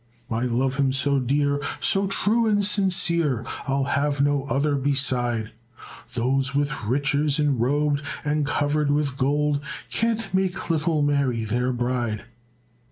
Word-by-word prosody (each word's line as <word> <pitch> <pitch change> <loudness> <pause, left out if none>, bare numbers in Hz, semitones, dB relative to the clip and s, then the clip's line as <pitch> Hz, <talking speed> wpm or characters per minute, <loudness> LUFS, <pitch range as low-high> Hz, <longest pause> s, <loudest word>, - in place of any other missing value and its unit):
I 115 +2 0
love 130 +2 0
him 135 -2 +2
so 140 +1 +2
dear, 140 +2 +1 0.2
so 195 0 +1
true 225 +4 +2
and 205 -2 +2
sincere, 170 - +1 0.2
I'll 135 0 +1
have 140 +1 0
no 140 -1 +1
other 145 +1 0
beside; 125 -5 0 0.6
Those 130 +2 0
with 145 -5 -1
riches 140 +4 +1
enrobed 145 +1 +1 0.2
and 150 0 +1
covered 145 +1 0
with 145 -2 0
gold 145 +2 +1 0.3
Can't 225 -4 -1
make 190 -2 0
little 155 -1 +1
Mary 140 -6 +1
their 125 +3 0
bride." 120 -3 -2
140 Hz, 130 wpm, -24 LUFS, 130-150 Hz, 0.6 s, him